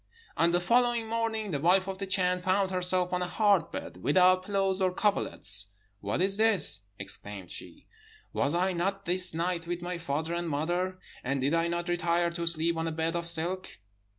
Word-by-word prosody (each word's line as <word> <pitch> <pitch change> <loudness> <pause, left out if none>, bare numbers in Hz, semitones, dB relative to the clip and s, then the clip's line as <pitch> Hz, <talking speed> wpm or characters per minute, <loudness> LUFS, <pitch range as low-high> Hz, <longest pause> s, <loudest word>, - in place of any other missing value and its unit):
"On 165 - +3
the 175 - +2
following 240 +3 +1
morning 220 -2 -2
the 145 - -2
wife 185 +5 +3
of 190 0 -5
the 195 - -4
Chan 180 -1 +1
found 190 +1 0
herself 180 0 0
on 180 - 0
a 180 - -1
hard 200 -4 +2
bed, - - -7
without 185 - +3
pillows 195 -1 0
or 185 -1 +2
coverlets. 105 - +1 0.3
'What 100 - -2
is 195 +1 +2
this?' 215 - +5 0.2
exclaimed 100 -1 -3
she; - - -9 0.5
'was 140 +3 0
I 185 +2 +1
not 195 +3 -2
this 180 0 +5
night 170 0 -2
with 175 0 -4
my 175 0 -4
father 160 +1 -3
and 170 -1 -3
mother 175 +5 -2 0.3
and 135 +2 -1
did 135 +4 0
I 165 0 +1
not 170 0 -3
retire 170 0 0
to 170 0 -4
sleep 165 0 0
on 165 0 -2
a - - -2
bed 160 +1 -2
of 170 0 -2
silk?' 175 +3 0
175 Hz, 195 wpm, -28 LUFS, 165-190 Hz, 0.5 s, this